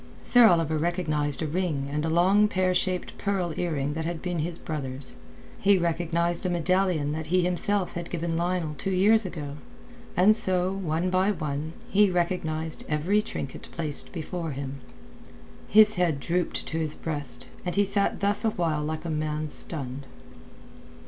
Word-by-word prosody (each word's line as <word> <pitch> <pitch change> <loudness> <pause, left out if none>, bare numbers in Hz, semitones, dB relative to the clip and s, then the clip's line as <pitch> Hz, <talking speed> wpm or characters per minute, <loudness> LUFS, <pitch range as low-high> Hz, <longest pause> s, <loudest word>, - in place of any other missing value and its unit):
Sir 245 -2 +6
Oliver 165 -4 +2
recognized 155 -4 0
a - - 0
ring 155 -4 -1
and 150 +1 -1
a 160 - 0
long 190 +6 +4
pear 185 -2 +1
shaped 180 0 -1
pearl 190 -4 -1
earring 150 -5 -1
that 160 +1 -3
had 165 0 -3
been 175 -1 -3
his 165 +2 -2
brother's; 135 -5 -5 0.5
he 200 0 +4
recognized 170 0 0
a 185 - 0
medallion 175 -3 +1
that 155 +1 -4
he 180 +2 +2
himself 180 +2 0
had 170 0 -5
given 170 -1 -2
Lionel 170 -2 -1
two 150 +6 -4
years 200 +3 +3
ago; 145 -5 -6 0.6
and 200 +4 +6
so, 185 -2 +5
one 180 -2 -1
by 185 +2 +2
one, 155 -4 -3
he 205 -3 +4
recognized 165 -3 -1
every 170 +8 +2
trinket 140 - -6
placed 155 -3 -4
before 170 0 -4
him. 135 0 -6 0.9
His 215 0 +6
head 170 -5 +1
drooped 175 +4 -1
to 160 - -3
his 155 -2 -2
breast, 145 -4 -4 0.2
and 180 - -3
he 205 0 +3
sat 200 0 +2
thus 200 +2 +3
awhile 170 -8 0
like 155 +2 -4
a - - -3
man 155 0 -2
stunned. 135 -3 -5
170 Hz, 160 wpm, -26 LUFS, 155-185 Hz, 0.9 s, Sir